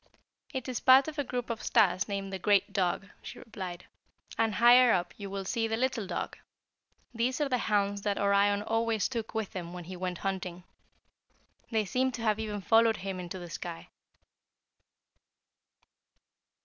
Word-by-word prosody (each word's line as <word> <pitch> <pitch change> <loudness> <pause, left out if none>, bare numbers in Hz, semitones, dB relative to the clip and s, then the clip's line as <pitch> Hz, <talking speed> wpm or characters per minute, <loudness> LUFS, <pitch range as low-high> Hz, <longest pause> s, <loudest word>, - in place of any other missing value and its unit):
"It 260 -3 -4
is 255 -2 -2
part 265 +2 +6
of 310 -1 -5
a - - +1
group 245 -2 -3
of 225 - -4
stars 185 -2 +3
named 195 -1 -4
the 190 - -3
'Great 200 0 +2
Dog,'" 190 0 0
she - - -9
replied; 185 -5 -7 0.5
"and 225 -2 +1
higher 245 +1 +7
up 175 -3 0
you 200 -2 -7
will 195 0 -4
see 225 +4 0
the 225 0 -1
'Little 240 -4 -1
Dog.' - - -4 0.7
These 245 +4 0
are 295 - +1
the 250 -2 +1
hounds 200 -2 0
that 200 -1 -1
Orion 200 0 +3
always 225 -1 0
took 230 -3 -5
with 220 -3 -3
him 175 -2 -5
when 180 -1 -7
he 185 +2 -8
went 180 0 -3
hunting. 180 -2 -4 1.1
They 220 -2 +1
seem 260 +6 0
to 235 - -5
have 215 -1 +1
even 210 -2 -3
followed 225 +2 +4
him 185 -2 -5
to 190 - -5
the 175 -2 -9
sky. 170 -1 -7
205 Hz, 170 wpm, -30 LUFS, 190-230 Hz, 1.1 s, higher